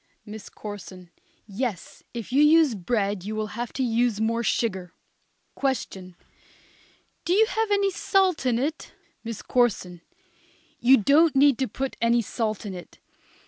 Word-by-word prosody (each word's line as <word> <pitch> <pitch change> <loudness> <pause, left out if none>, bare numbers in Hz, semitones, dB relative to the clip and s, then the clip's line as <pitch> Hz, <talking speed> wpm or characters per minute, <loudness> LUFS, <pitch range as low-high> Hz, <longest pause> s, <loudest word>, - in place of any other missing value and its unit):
MISS 215 0 -9
CORSON. 185 -4 -10 0.3
Yes, 210 -2 -5
if 235 0 -7
you 280 - +4
use 305 -2 +5
bread 200 -1 -2
you 215 +2 -5
would 215 -1 -3
have 235 +1 -5
to 265 - -1
use 235 -2 +1
more 230 +1 0
sugar. 190 -6 -1 0.6
Question. 190 -9 -3 1.1
Do 350 - 0
you 435 +3 +5
have 445 0 -1
any 400 -1 +2
salt 380 -3 +1
in 240 -2 +2
it? 300 +6 -3 0.3
MISS 230 -2 -6
CORSON. 190 -8 0 0.8
You 260 +3 +6
don't 290 +8 +4
need 275 -2 +4
to 265 - 0
put 265 +5 -5
any 235 0 +3
salt 215 0 -3
in 200 - -5
it. 175 -2 -11
235 Hz, 145 wpm, -25 LUFS, 205-275 Hz, 1.1 s, You